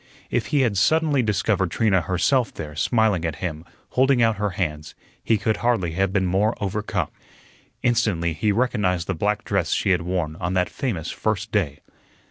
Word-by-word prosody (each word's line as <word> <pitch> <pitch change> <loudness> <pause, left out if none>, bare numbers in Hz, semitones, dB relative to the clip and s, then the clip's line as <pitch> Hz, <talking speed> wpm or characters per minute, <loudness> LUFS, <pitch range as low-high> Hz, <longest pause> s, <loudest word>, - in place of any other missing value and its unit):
If - - 0
he 145 - +2
had 110 -7 +1
suddenly 155 +3 +3
discovered 105 -4 +1
Trina 95 +2 +2
herself 115 +9 +1
there, 75 -2 -7
smiling 110 - +2
at 80 -3 -2
him, 80 -2 -5 0.3
holding 130 0 +3
out 115 -2 +3
her 105 0 0
hands, 75 -4 -3 0.3
he 110 - +2
could 110 +1 0
hardly 115 -8 +1
have 95 +3 0
been 95 -1 +1
more 100 +5 +1
overcome. 105 +1 -2 0.7
Instantly 105 -9 +1
he 105 +7 0
recognized 100 -6 0
the 95 - -1
black 105 +5 -1
dress - - 0
she 95 - +1
had 90 -2 +2
worn 85 -3 -2
on 90 +2 -2
that 90 -1 +1
famous 100 - -3
first 105 -1 -2
day. 85 -10 -1
100 Hz, 175 wpm, -23 LUFS, 90-110 Hz, 0.7 s, suddenly